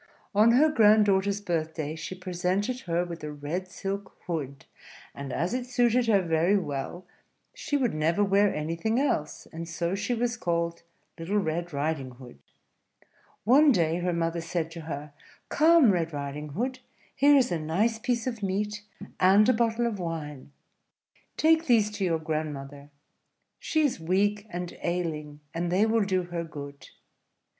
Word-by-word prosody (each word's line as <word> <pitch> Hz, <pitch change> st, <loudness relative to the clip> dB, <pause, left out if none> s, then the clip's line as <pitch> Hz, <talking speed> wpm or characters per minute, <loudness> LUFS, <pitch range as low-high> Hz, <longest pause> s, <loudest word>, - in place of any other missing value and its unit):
On 215 Hz, +3 st, +5 dB
her 285 Hz, +6 st, +6 dB
grand 215 Hz, -6 st, +5 dB
daughter's 200 Hz, 0 st, +1 dB
birthday 160 Hz, -4 st, -2 dB
she 165 Hz, +3 st, -6 dB
presented 185 Hz, +6 st, -2 dB
her 175 Hz, -5 st, -1 dB
with 170 Hz, -2 st, -8 dB
a 150 Hz, -, -4 dB
red 150 Hz, +6 st, -4 dB
silk 195 Hz, +1 st, -6 dB
hood; 140 Hz, -6 st, -4 dB, 0.5 s
and 140 Hz, -1 st, -7 dB
as 170 Hz, -, -1 dB
it 250 Hz, 0 st, -2 dB
suited 245 Hz, -1 st, +2 dB
her 200 Hz, -4 st, +4 dB
very 170 Hz, +4 st, +2 dB
well, 155 Hz, +1 st, -4 dB, 0.5 s
she 290 Hz, -, -2 dB
would 250 Hz, -5 st, 0 dB
never 160 Hz, +6 st, +1 dB
wear 200 Hz, +1 st, +3 dB
anything 165 Hz, +10 st, -1 dB
else; 155 Hz, -, -1 dB
and 165 Hz, +1 st, -6 dB
so 170 Hz, +1 st, -2 dB
she 205 Hz, +5 st, -1 dB
was 240 Hz, +1 st, -1 dB
called 170 Hz, -3 st, -1 dB, 0.4 s
Little 180 Hz, +6 st, -1 dB
Red 175 Hz, -2 st, -1 dB
Riding 140 Hz, -3 st, -2 dB
Hood. 120 Hz, -, -13 dB, 1.0 s
One 280 Hz, +6 st, +6 dB
day 170 Hz, -6 st, +2 dB
her 180 Hz, 0 st, 0 dB
mother 170 Hz, 0 st, -1 dB
said 165 Hz, 0 st, -3 dB
to 165 Hz, 0 st, -8 dB
her, 145 Hz, 0 st, -6 dB, 0.4 s
"Come, 315 Hz, -6 st, +5 dB
Red 165 Hz, -3 st, -1 dB
Riding 145 Hz, +1 st, -5 dB
Hood, 255 Hz, -, -2 dB, 0.4 s
here 285 Hz, +2 st, +5 dB
is 260 Hz, -3 st, +3 dB
a 170 Hz, -, 0 dB
nice 200 Hz, +9 st, 0 dB
piece 240 Hz, -1 st, -1 dB
of 235 Hz, -4 st, -4 dB
meat, 210 Hz, +2 st, -2 dB, 0.4 s
and 195 Hz, +4 st, +5 dB
a 255 Hz, -, +5 dB
bottle 230 Hz, 0 st, +1 dB
of 220 Hz, -4 st, -2 dB
wine: 150 Hz, -5 st, -5 dB, 0.9 s
take 320 Hz, +1 st, +3 dB
these 220 Hz, -4 st, +4 dB
to 210 Hz, -1 st, -4 dB
your 170 Hz, -3 st, +1 dB
grandmother; 145 Hz, -3 st, -5 dB, 0.7 s
she 315 Hz, -1 st, 0 dB
is 280 Hz, -, 0 dB
weak 205 Hz, +5 st, 0 dB
and 175 Hz, 0 st, -5 dB
ailing, 155 Hz, -4 st, -3 dB
and 170 Hz, +1 st, -2 dB
they 195 Hz, +4 st, +3 dB
will 225 Hz, -1 st, +2 dB
do 185 Hz, -2 st, 0 dB
her 175 Hz, -1 st, -4 dB
good. 145 Hz, -3 st, -9 dB
180 Hz, 160 wpm, -27 LUFS, 160-220 Hz, 1.0 s, her